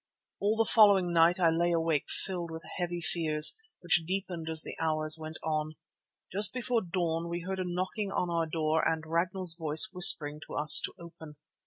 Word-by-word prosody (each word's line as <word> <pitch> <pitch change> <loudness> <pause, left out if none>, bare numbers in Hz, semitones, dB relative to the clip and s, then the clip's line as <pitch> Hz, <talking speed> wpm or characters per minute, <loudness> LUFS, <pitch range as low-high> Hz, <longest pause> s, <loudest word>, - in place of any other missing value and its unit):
All 205 +2 -1
the 225 0 0
following 200 -6 +3
night 170 +2 +2
I 170 -2 +2
lay 170 +1 -1
awake 165 -3 -2
filled 175 -3 -5
with 160 0 -9 0.2
heavy 175 -1 -5
fears 160 -2 +3 0.3
which 175 -1 +1
deepened 175 -2 -6
as 160 -1 +1
the - - -9
hours 155 -1 +1
went 155 0 -9
on. 155 0 -4 0.6
Just 205 +5 +5
before 245 -2 -2
dawn 170 -2 -4
we 170 0 -6
heard 190 +2 -6
a - - -3
knocking 185 +3 -5
on 180 - -3
our 165 -1 -3
door 155 0 -2
and 160 -1 -2
Ragnall's 170 +2 0
voice 160 +5 +3
whispering 150 -5 +5
to - - -10
us 150 +1 +7
to - - -9
open. 160 -3 -14
170 Hz, 185 wpm, -28 LUFS, 160-185 Hz, 0.6 s, us